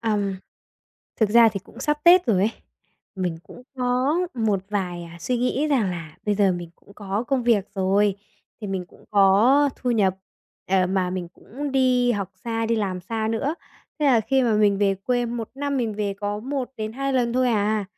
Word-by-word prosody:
ờm, 205 -3 -1 0.8
thực 215 - +3
ra 230 +1 +7
thì 200 -3 -4
cũng 190 - -15
sắp 295 0 0
Tết 350 0 +7
rồi 225 -5 +3
ấy, 210 +4 +2 0.7
mình 180 -3 -2
cũng - - -13
có 255 +5 +1 0.2
một 215 -5 0
vài, 180 -4 -2
à, 170 0 -11
suy 250 +8 -1
nghĩ 255 +4 0
rằng 240 -10 +2
là 165 -3 -7
bây 210 - +2
giờ 200 -2 +3
mình 175 -1 -6
cũng 200 - -20
có 205 +2 -3
công 265 -2 +1
việc 230 -5 +2
rồi, 195 +1 +2 0.4
thì 210 - -5
mình 190 -2 -3
cũng - - -20
có 215 +8 +5
thu 250 - -2
nhập, 200 -5 +2 0.6
ờ, 190 -1 +3
mà 185 -1 0
mình 180 -2 -4
cũng 280 +4 -7
đi 250 -2 +3
học 200 -4 -3
xa, 225 -1 -1
đi 230 0 +1
làm 190 -4 -2
xa 220 +4 -3
nữa, 270 +7 -1 0.4
thế 300 - +1
là 250 -5 +5
khi 265 +4 +1
mà 235 -3 +2
mình 205 -2 +3
về 200 -1 +2
quê, 245 +5 -1
1 230 -1 -5
năm 285 0 -2
mình 230 -5 -1
về 205 -1 -2
có 205 +1 -3
1-2 265 0 -4
lần 245 -3 +1
thôi 255 0 +2
à. 215 -2 +1
220 Hz, 200 wpm, -23 LUFS, 195-250 Hz, 0.8 s, ra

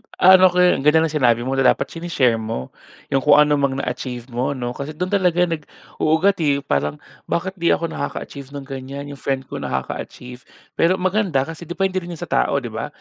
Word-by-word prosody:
ano 185 0 +7
ko 180 0 +2
yun. 180 - +4
Ang 135 - -5
ganda 160 +1 +5
ng 160 - -1
sinabi 120 -6 +2
mo 135 +2 -1
na 135 - +4
dapat - - -5
sine-share 145 -9 +1
mo 110 - -5 0.4
'yong 135 - +3
kung 145 +2 +5
ano 150 -1 +4
mang 140 -1 +1
na-achieve 125 -2 -4
m,o 125 +4 -1
'no? 120 -2 -3
Kasi 140 +4 -6
do'n 180 +3 -3
talaga 180 -3 +3
nag-uugat, 165 +2 -1
eh. 140 -3 +1
Parang 75 - -1 0.3
bakit 190 +2 -2
'di 170 - +3
ako 165 - -4
naka-achieve 140 -2 -6
ng 140 - -6
ganyan? 135 +1 -7
'Yong 140 - -9
friend 135 0 -1
ko - - -4
nakaka-achieve. 125 - -6 0.3
Pero 175 +3 +4
maganda 185 -7 +1
kasi 165 +3 -9
depende 190 +2 -1
rin 170 - -10
'yon - - -7
sa - - -9
tao, - - +2
'di - - -5
ba? - - -4
145 Hz, 210 wpm, -21 LUFS, 130-175 Hz, 0.4 s, ano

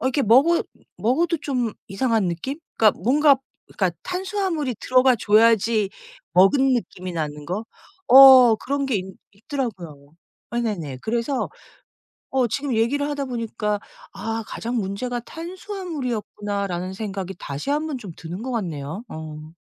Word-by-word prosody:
어 260 - -1
이렇게 270 +2 +1
먹어 270 +10 +5 0.3
먹어도 325 +9 +1
좀 250 -7 -1
이상한 220 -1 0
느낌? 260 - -4 0.2
그러니까 215 -2 +4
뭔가 280 +5 +5 0.3
그러니까 - - -1
탄수화물이 365 -7 -2
들어가 255 0 +4
줘야지 220 -1 +3 0.4
먹은 260 +10 +5
느낌이 185 -6 -4
나는 150 -2 -4
거? 195 +6 -3 0.4
어 255 -3 +9
그런 280 +5 -2
게 260 -5 0
있 190 0 -5 0.2
있더라고요. 195 - -6 0.4
네네네. 200 - -3
그래서 235 +4 -1 0.8
어 260 -2 +2
지금 275 +3 -2
얘기를 275 +6 +1
하다 285 -2 -3
보니까 220 -4 -2 0.3
'아 225 +3 -4
가장 240 +2 -4
문제가 230 +4 -2
탄수화물이었구나.'라는 245 - -4
생각이 195 -2 -5
다시 140 - -5
한번 300 -2 -1
좀 200 -8 -9
드는 175 +5 -7
것 260 - -4
같네요. 170 - -4
어. 155 0 -9
230 Hz, 310 characters per minute, -23 LUFS, 195-270 Hz, 0.8 s, 어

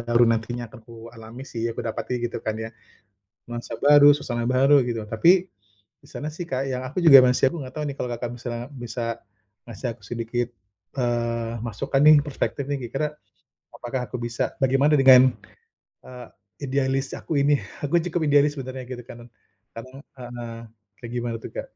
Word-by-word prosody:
baru 120 +1 +3
nantinya 115 +1 -2
akan 110 - -14
ku 115 - -14 0.2
alami 115 +2 -11
sih, 115 -1 -4
aku - - -6
dapati, 120 +2 -3
gitu 120 - -3
kan 110 0 -2
ya. 110 - -4 0.8
Nuansa 120 -1 -6
baru, 145 0 +7
suasana 120 -5 -3
baru, 135 +2 +5
gitu. 115 -2 -3
Tapi 110 +11 +4 0.7
di - - -18
sana 150 - -5
sih, 175 +1 -6
Kak, 130 +1 -1
yang 130 0 -3
aku 145 - -11
juga 140 -5 +10
masih 125 +1 +3
aku 170 - -5
nggak 130 - -10
tahu 150 - -2
nih 140 - -6
kalau 125 - -3
Kakak 120 0 -4
misalnya 120 0 -5
bisa 120 -2 -6 0.7
ngasih 115 +3 -5
aku 120 - -31
sedikit, 120 +2 -3 0.5
eee, 115 -2 -1
masukan 135 +5 -1
nih, 155 +1 +9
perspektif 140 -1 -3
nih, 145 - -1
kira-kira 150 +4 -2 0.6
apakah 125 0 -5
aku - - -3
bisa 120 0 -3
bagaimana 135 +3 +3
dengan, 130 -1 +8 0.7
eee, 125 -1 -10 0.4
idealis 135 0 -1
aku 155 - -4
ini? 145 0 +3 0.3
Aku 170 +4 +2
cukup 170 -1 -2
idealis 145 +1 +3
sebenarnya, 130 -1 -6
gitu 125 -1 -7
kan. 120 0 -12 0.5
Kadang 130 +4 -10 0.2
heeh. 120 -2 -7 0.4
Kayak 120 -1 -8
gimana 120 -1 -2
tuh, - - -8
Kak? - - -3
125 Hz, 175 wpm, -24 LUFS, 120-135 Hz, 0.8 s, juga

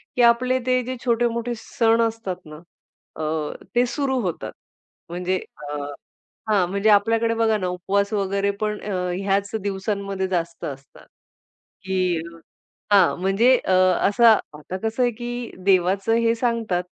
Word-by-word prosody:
की 250 - +2
आपले 250 +2 +4
ते 255 0 +2
जे 255 +2 -4
छोटे-मोठे 235 0 0
सण 230 0 +1
असतात 195 -5 -6
ना 155 0 -11 0.6
अ, 155 - -2 0.5
ते 245 +1 +4
सुरु 270 -2 -1
होतात. 180 -5 -4 0.6
म्हणजे 180 +2 -1 0.3
अ 150 - -4 0.7
हां, 195 -4 +3
म्हणजे 200 +3 +1
आपल्याकडे 225 +2 +3
बघा 225 -1 +2
ना 185 -3 -2
उपवास 195 +3 -1
वगैरे 200 0 0
पण 210 0 -1
अ, 210 - -5 0.3
ह्याच 200 +1 0
दिवसांमध्ये 195 -1 -2
जास्त 170 -2 -3
असतात, 135 -1 -9 0.8
की 185 -3 0 0.7
हां, 195 -4 +5
म्हणजे 220 +7 +4
अ, - - -2 0.4
असं 235 +4 +1 0.3
आता 165 +5 -6
कसं 225 +3 -1
आहे 245 - +3
की 240 +1 -6
देवाचं 195 +3 +3
हे 230 0 +2
सांगतात 225 -6 -1
200 Hz, 140 wpm, -23 LUFS, 185-230 Hz, 0.8 s, हां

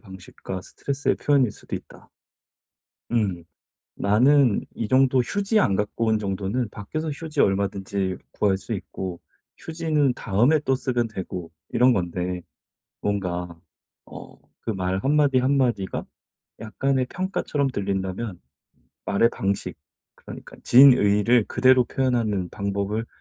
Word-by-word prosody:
방식과 95 -2 -8
스트레스의 140 +6 -2
표현일 140 -5 +2
수도 - - -7
있다.' - - -14 1.0
음. 95 -7 0 0.5
나는 125 +4 +3
이 115 - -3
정도 130 +2 +3
휴지 205 - 0
안 100 - +3
갖고 105 +3 -1
온 110 -1 +2
정도는 100 +4 -2
밖에서 155 +11 -5
휴지 150 0 -4
얼마든지 95 -1 0
구할 100 -2 +1
수 95 +4 -7
있고 95 -2 -5 0.4
휴지는 155 -5 0
다음에 120 +10 +2
또 135 -2 +1
쓰면 120 -3 -1
되고 90 -4 -6 0.2
이런 125 +2 +4
건데 90 -2 -2 0.6
뭔가 90 -4 -3 0.5
어 - - -12 0.2
그 115 - -3
말 95 -1 -1
한마디 140 +3 +3
한마디가 125 -7 0 0.6
약간의 130 +4 -1
평가처럼 170 -6 -1
들린다면 95 -2 -3 0.7
말의 115 +4 +3
방식 95 -4 -2 0.4
그러니까 - - -11
진의를 120 -3 +6
그대로 130 -1 +4
표현하는 115 -9 -1
방법을 100 +3 -2
110 Hz, 265 characters per minute, -24 LUFS, 95-130 Hz, 1.0 s, 진의를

